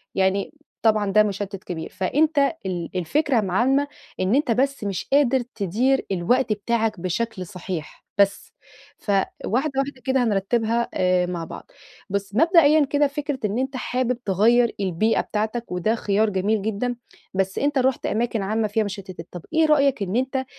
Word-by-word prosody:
يعني، 195 +5 +1 0.3
طبعًا، 215 -3 +2
ده 215 +2 +6
مُشتِّت 200 -1 -4
كبير. 160 -2 -5
فأنت 295 - +1 0.3
ال 175 -3 -3
الفكرة 260 - +1
العامة 240 +9 +2 0.3
إن 185 +5 +2
أنت 280 -3 +2
بس 275 +2 0
مش 195 -3 -3
قادر 270 -2 +4 0.2
تِدير 230 +7 +1
الوقت 215 +7 +2
بتاعك 220 0 -1
بشكل 185 +2 -2
صحيح، 175 -2 -7
بس. 200 -1 +1 0.4
فواحدة 220 +7 -1
واحدة 275 -1 -3
كده 265 -1 +2
هنرتِّبها، 225 +2 0
آآ، 180 -1 +2
مع 175 -2 -4
بعض. 330 - -10 0.4
بُص، 200 0 -3
مبدئيًا 310 - +5
كده، 285 +1 +2
فكرة 290 -1 -4
إن 210 +3 -1
أنت 265 +1 -2
حابب 250 -1 -1
تغيِّر 230 +5 +4
البيئة 195 +3 +1
بتاعتك، 220 +2 -3
وده 180 +5 0
خيار 210 0 +1
جميل 205 +2 0
جدًا، 220 +4 -2 0.4
بس 190 0 -1
أنت 290 0 +1
رُحت 260 0 +1
أماكن 230 0 0
عامة 215 +3 0
فيها 215 +2 0
مُشتِّتات. 190 -4 -7
طب، 175 - -7
إيه 320 0 +4
رأيك 280 -6 +3
إن 190 +2 -3
أنت 260 +1 0
220 Hz, 155 wpm, -23 LUFS, 195-260 Hz, 0.4 s, ده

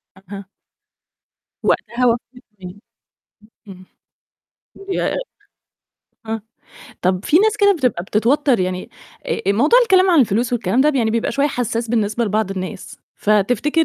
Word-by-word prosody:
أها. 195 0 -11 1.2
وقتها 250 +1 0
وافقوا 245 +1 -1 0.2
إزاي؟ 180 0 -9 0.9
امم، 185 -1 -12 1.0
ياه! 380 - -1 1.1
آه 225 0 -3 0.6
طب 185 +1 0
في 325 - +4
ناس 430 +1 +2
كده 405 -1 +4
بتبقى 250 - -1
بتتوتر 240 +4 +1
يعني 185 0 -3 0.4
ا 470 - -1
الموضوع 285 - +4
الكلام 380 -5 +4
عن 330 -5 +5
الفلوس 235 +2 0
والكلام 235 +1 0
ده 300 +2 +3
يعني 230 -4 +1
بيبقى 230 0 -1
شوية 280 +1 +1
حساس 235 -2 -3
بالنسبة 225 0 0
لبعض 215 -1 -1
الناس، 185 -2 -7 0.2
فتفتكر 245 +10 +1
230 Hz, 125 wpm, -19 LUFS, 200-285 Hz, 1.2 s, عن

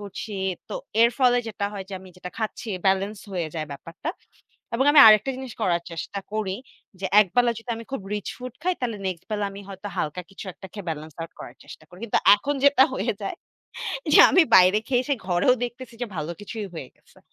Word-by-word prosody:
করছি। 205 +1 -7 0.4
তো - - -5 0.3
এর 235 - +6
ফলে 245 -2 +4
যেটা 205 -2 -4
হয় 195 -2 -6
যে, 200 - -6
আমি 190 - -13
যেটা 180 0 -8
খাচ্ছি 220 +1 -4 0.2
বেলেন্স 195 +2 +1
হয়ে 175 -4 -2
যায় 155 -2 -3
ব্যাপারটা। 165 - -6 0.7
এবং 265 +3 +2
আমি 290 - +7
আরেকটা 215 +4 +6
জিনিস 260 -3 -7
করার 170 -4 +1
চেষ্টা 170 +4 -5
করি 205 -3 -2 0.4
যে, 195 - -3 0.2
একবেলা 235 +5 +2
যদি 225 +2 -10
আমি 230 - -8
খুব 270 - -3
রিচ 210 -1 -4
ফুড 250 -1 -7
খাই 365 +1 +1
তাহলে 230 -4 -2
নেক্সট 185 -2 -4
বেলা 205 -1 0
আমি 200 +1 -9
হয়তো 195 +1 -7
হালকা 155 +2 -2
কিছু 195 - -9
একটা 190 - -11
খেয়ে 200 -4 -8
বেলেন্স 155 0 -6
আউট 165 0 -6
করার - - -9
চেষ্টা - - -12
করি। 180 +3 -15
কিন্তু 230 - +1 0.2
এখন 280 +8 -2
যেটা 280 -2 +7
হয়ে 230 0 -1
যায় 195 - -3 0.8
যে - - +8
আমি 370 - +6
বাইরে 185 +3 +7
খেয়ে 250 -1 +2
এসে 285 0 +1
ঘরেও 180 +7 +3
দেখতেছি 240 0 -8
যে - - -1
ভালো 155 +1 -3
কিছুই 210 0 -6
হয়ে 135 -5 -7
গেছে। - - -24
205 Hz, 210 wpm, -24 LUFS, 180-240 Hz, 0.8 s, যে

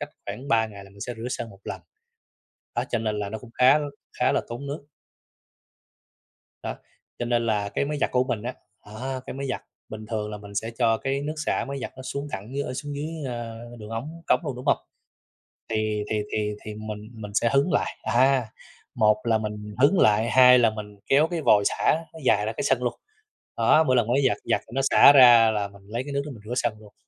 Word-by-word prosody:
cách 145 - -4 0.2
khoảng 135 +3 -7
3 110 -1 +3
ngày 100 -2 -11
là 100 - -16
mình 100 - -17
sẽ 120 +3 -4
rửa 115 +3 -5
sân 115 -2 -4
một 100 -1 -16
lần. - - -5 0.9
Đó, 120 +1 0
cho 120 - +1
nên 110 -1 -2
là 100 -1 -3
nó 110 - -4
cũng 120 - -14
khá 130 +4 +6
l - - -3 0.3
khá - - +1
là - - +2
tốn 120 +4 -6
nước. 145 0 -6 1.8
Đó, - - -4 0.4
cho 120 - -2
nên 120 -1 +1
là 105 -2 0
cái 100 - -1
máy 150 0 -3
giặt - - +1
của 125 0 +3
mình 120 -5 -3
á, 125 +1 -4 0.3
đó, 130 +5 -5
cái - - -6
máy 140 0 -4
giặt 130 - -3 0.3
bình 110 0 -8
thường 105 -2 -3
là 105 - -5
mình 100 0 -12
sẽ 115 +3 -2
cho 115 0 +3
cái 135 +3 -2
nước 150 +2 -3
xả - - 0
máy 140 0 -4
giặt 130 - -5
nó 130 - -8
xuống 140 +2 -4
thẳng 100 +3 -5
dưới, 140 - -1
ờ, 125 -2 -5
xuống 145 +1 -5
dưới, 150 +2 -3 0.3
a, 115 -1 -5 0.2
đường 105 -1 -9
ống 150 +9 -6
cống 125 - +3
luôn, 130 - -4
đúng 125 - -8
hông? - - +4 0.9
Thì 110 -1 -1
thì 105 -1 0
thì 105 -1 -1
thì 105 - -5
mình 110 0 -7
mình 105 -2 -8
sẽ 115 +3 +2
hứng 140 +6 +3
lại, - - 0
à, 130 -2 +3 0.5
một 105 0 +4
là 115 -2 +2
mình 105 -1 -6
hứng 175 +7 +5
lại, 110 +2 +4
hai 125 -1 +7
là 115 - +5
mình 105 -2 -8
kéo 150 +4 +4
cái 170 -2 -3
vòi 105 -7 +5
xả - - +2 0.2
nó 160 - -10
dài 105 -4 +3
ra 110 - -1
cái - - -4
sân 125 - +1
luôn. 120 - 0 0.6
Đó, 160 - +5
mỗi 130 -4 +2
lần 120 -2 +2
máy 130 +4 +2
giặt - - 0
giặt - - +1
thì - - -20
nó 135 - +2
xả - - +9
ra 120 -5 +8
là 105 -2 -1
mình 100 0 -17
lấy 115 +4 -3
cái 145 +1 -7
nước 140 - 0
đó 150 - -6
mình 115 -6 -11
rửa 120 - -4
sân 120 -3 0
luôn. 105 -1 -16
115 Hz, 245 wpm, -25 LUFS, 105-135 Hz, 1.8 s, xả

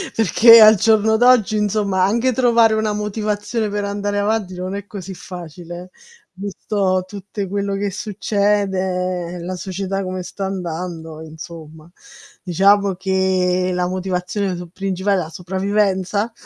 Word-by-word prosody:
perché 230 +2 +7
al 215 0 +9
giorno 220 +2 +3
d'oggi, 240 -3 +4
insomma, 205 -2 +1
anche 235 +6 +2
trovare 235 -2 +4
una 215 -1 0
motivazione 210 +1 -2
per 205 0 -3
andare 205 0 -2
avanti 205 -2 -1
non 185 +2 -5
è 200 0 -6
così 195 -2 -8
facile, 175 0 -9
eh - - -31 0.4
visto 195 -1 -1
tutte 200 0 -6
quello 200 +1 -2
che 200 +1 -1
succede, 190 -4 -1
la 180 +2 -5
società 195 +2 -4
come 185 0 -4
sta 195 +2 -6
andando, 170 -3 -5
insomma. 160 0 -11 0.5
Diciamo 200 +2 +3
che 185 -1 0
la 180 0 0
motivazione 185 +1 -2
sul 175 -1 -8
principale 195 +1 -1
è - - -1
la 160 - -8
sopravvivenza? 195 +3 -1
195 Hz, 135 wpm, -19 LUFS, 180-205 Hz, 0.5 s, al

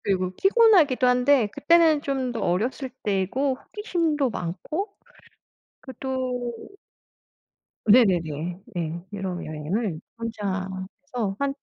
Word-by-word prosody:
그리고 185 -2 0
피곤하기도 390 - +5
한데 250 0 +4
그때는 325 -1 +4
좀 265 -3 -1
더 230 - -4
어렸을 240 +10 -1
때고 215 +7 0
호기심도 320 - -1
많고 305 - -4 0.9
그 260 - -9
또 255 -2 -2 1.3
네네네. 175 - +3 0.2
네. 170 0 -3
유럽 190 -3 -4
여행을 155 +4 -3 0.2
혼자 205 -5 -3 0.4
해서 220 -7 -2
한 280 -1 0
245 Hz, 215 characters per minute, -25 LUFS, 190-280 Hz, 1.3 s, 피곤하기도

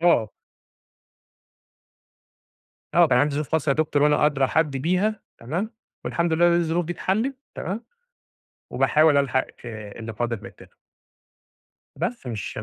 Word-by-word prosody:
آه. 120 -11 +4 2.7
آه 175 0 +7
كان 125 -4 +3
عندي 145 +2 +2
ظروف 150 0 -2
خاصة 160 -1 +1
يا 140 - +4
دكتور، 150 -1 +1
وأنا 150 0 +4
أدرى 140 -3 +2
حد 150 -1 +1
بيها، 185 +9 0 0.2
تمام، 170 - -3 0.3
والحمد 170 -1 0
لله 170 +2 +4
إن 175 - +5
الظروف 170 +1 0
دي 170 - -3
اتحلت 220 +10 -1 0.2
تمام، 200 +7 -4 0.9
وباحاول 155 -1 +4
ألحق، 135 -2 +2 0.2
آآ، 105 -3 -8
اللي 115 0 -6
فاضل 120 +1 -2
من - - -8
الTerm - - -18 1.2
بس 230 - -4
مش 110 -4 -5
150 Hz, 140 wpm, -24 LUFS, 130-175 Hz, 2.7 s, آه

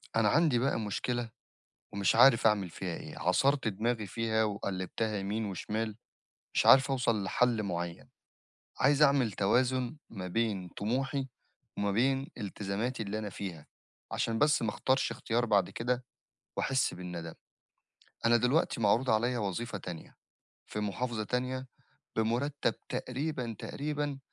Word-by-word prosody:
أنا 110 -2 +4
عَندي 150 -5 +4
بقى 135 -1 +1
مشكلة 115 +3 -2 0.6
ومش 100 +1 +2
عارف 120 -1 +7
أعمِل 100 -5 +2
فيها 90 0 -4
إيه، - - -8
عصَرت 135 +8 +2
دماغي 110 +2 -1
فيها 110 +2 0
وقلِّبتها 105 +1 -2
يمين 105 +3 -2
وشِمال 105 +2 -3 0.6
مش - - +2
عارف 135 +1 +7
أوصَل 115 -6 +1
لحل 115 +3 +2
معيّن، 85 -3 -4 0.7
عايز 140 +2 +4
أعمِل 140 -6 +5
توازُن 125 +7 +1
ما 95 -4 -6
بين 100 -2 -1
طموحي 135 - -1 0.5
وما 100 0 +1
بين 135 +6 +2
التزاماتي 105 +3 -3
اللي 105 +1 -3
أنا 105 - -4
فيها 90 -6 -7 0.4
عشان 115 -1 0
بس 150 0 +4
ما 110 - +1
اختارش 130 +4 +1
اختيار 120 +1 0
بعد 100 -4 +3
كده 125 +1 -2 0.5
وأحس 130 -6 +1
بالندم. 90 -2 -6 0.9
أنا 120 +1 +6
دلوقتي 125 +2 +2
معروض 115 +5 +3
عليَّ 120 +3 +2
وظيفة 105 0 -2
تانية 90 -3 -8 0.5
في 105 - -4
محافظة 110 +2 -2
تانية 130 +3 -2 0.5
بمُرتّب 120 +6 0
تقريبًا، 125 -3 -3
تقريبًا 145 -1 -3
115 Hz, 130 wpm, -31 LUFS, 100-130 Hz, 0.9 s, عارف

